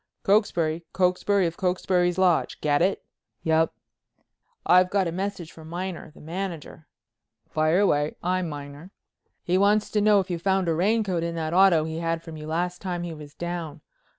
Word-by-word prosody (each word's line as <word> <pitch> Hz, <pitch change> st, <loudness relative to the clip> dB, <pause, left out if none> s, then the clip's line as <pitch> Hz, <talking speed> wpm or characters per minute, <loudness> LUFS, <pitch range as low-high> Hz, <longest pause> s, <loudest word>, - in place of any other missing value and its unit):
"Cokesbury, 170 Hz, -6 st, +1 dB
Cokesbury 185 Hz, +1 st, +2 dB
of 170 Hz, 0 st, -3 dB
Cokesbury 180 Hz, -1 st, +1 dB
Lodge—get 170 Hz, -4 st, +1 dB
it?" 190 Hz, +3 st, 0 dB, 0.4 s
"Yep." 160 Hz, -1 st, +2 dB, 0.9 s
"I've 180 Hz, 0 st, +5 dB
a 190 Hz, -4 st, +2 dB
message 185 Hz, -2 st, -4 dB
for 160 Hz, -, -13 dB
Miner—the 175 Hz, -1 st, -6 dB
manager." 165 Hz, -2 st, -6 dB, 0.6 s
"Fire 155 Hz, +4 st, +2 dB
away, 150 Hz, -6 st, +1 dB
I'm 180 Hz, -1 st, 0 dB
Miner." 145 Hz, +3 st, -9 dB, 0.5 s
"He 180 Hz, +1 st, +1 dB
wants 205 Hz, +1 st, +2 dB
to 210 Hz, -, +1 dB
know 210 Hz, -1 st, +5 dB
if 190 Hz, -1 st, -3 dB
you 170 Hz, -, -2 dB
found 190 Hz, 0 st, +1 dB
a 165 Hz, -, +2 dB
raincoat 195 Hz, 0 st, +1 dB
in 170 Hz, 0 st, -3 dB
that 160 Hz, 0 st, -3 dB
auto 180 Hz, -4 st, +5 dB
he 160 Hz, +1 st, -4 dB
had 165 Hz, 0 st, -2 dB
from 165 Hz, -2 st, -9 dB
you 155 Hz, 0 st, -8 dB
last 175 Hz, +3 st, -2 dB
time 180 Hz, -3 st, -3 dB
he 170 Hz, -1 st, -5 dB
was 150 Hz, -1 st, -11 dB
down? 170 Hz, -3 st, -5 dB
175 Hz, 160 wpm, -25 LUFS, 160-190 Hz, 0.9 s, I've